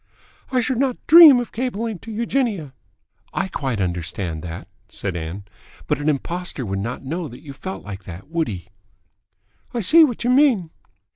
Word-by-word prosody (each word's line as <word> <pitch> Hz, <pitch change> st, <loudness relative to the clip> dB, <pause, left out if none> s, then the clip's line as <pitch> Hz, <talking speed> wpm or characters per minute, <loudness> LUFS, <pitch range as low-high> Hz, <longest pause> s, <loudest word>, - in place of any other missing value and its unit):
"I 255 Hz, -1 st, +2 dB
should 245 Hz, +1 st, -1 dB
not 265 Hz, -2 st, +1 dB
dream 315 Hz, -5 st, +10 dB
of 240 Hz, -, -5 dB
cabling 230 Hz, -4 st, -3 dB
to 225 Hz, -, -10 dB
Eugenia." 220 Hz, -, -1 dB, 0.6 s
"I 190 Hz, -, 0 dB
quite 135 Hz, -, -3 dB
understand 85 Hz, -2 st, -3 dB
that," 85 Hz, +2 st, -7 dB, 0.2 s
said 95 Hz, -4 st, -4 dB
Ann. 85 Hz, +4 st, -5 dB, 0.4 s
"But -, -, -1 dB
an 145 Hz, +1 st, 0 dB
impostor 155 Hz, -1 st, -3 dB
would 95 Hz, -1 st, -3 dB
not 120 Hz, +6 st, -5 dB
know 165 Hz, +4 st, -3 dB
that 125 Hz, -, -12 dB
you 140 Hz, -3 st, -9 dB
felt 190 Hz, +7 st, -7 dB
like 100 Hz, -2 st, -8 dB
that, 90 Hz, +1 st, -9 dB
would 165 Hz, 0 st, -1 dB
he?" 95 Hz, -2 st, -7 dB, 1.1 s
"I 235 Hz, -, 0 dB
see 320 Hz, -, +7 dB
what 245 Hz, -6 st, 0 dB
you 245 Hz, -, +2 dB
mean." 250 Hz, -, +3 dB
160 Hz, 170 wpm, -21 LUFS, -, 1.1 s, dream